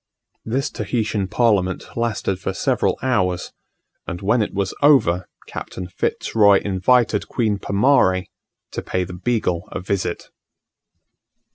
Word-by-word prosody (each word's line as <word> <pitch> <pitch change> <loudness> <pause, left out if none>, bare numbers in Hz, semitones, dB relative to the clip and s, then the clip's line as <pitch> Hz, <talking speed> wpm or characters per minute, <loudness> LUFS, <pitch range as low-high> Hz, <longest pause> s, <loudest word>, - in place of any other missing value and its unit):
This 135 +5 -1
Tahitian 105 -4 -1
parliament 100 -5 +1
lasted 110 -5 -1
for - - -3
several - - +1
hours; 90 -9 0 0.6
and 90 - -4
when 110 +5 +2
it 105 - -1
was 100 -1 -2
over 110 - +4 0.2
Captain 90 - -7
Fitz 85 - -3
Roy 100 -3 +6
invited 105 +3 +2
Queen 110 -4 0
Pomarre 100 -4 +3 0.5
to - - -4
pay 95 - -1
the 90 0 -7
Beagle 90 -3 -1
a - - -4
visit. 95 -1 -3
100 Hz, 125 wpm, -21 LUFS, 95-115 Hz, 0.6 s, Roy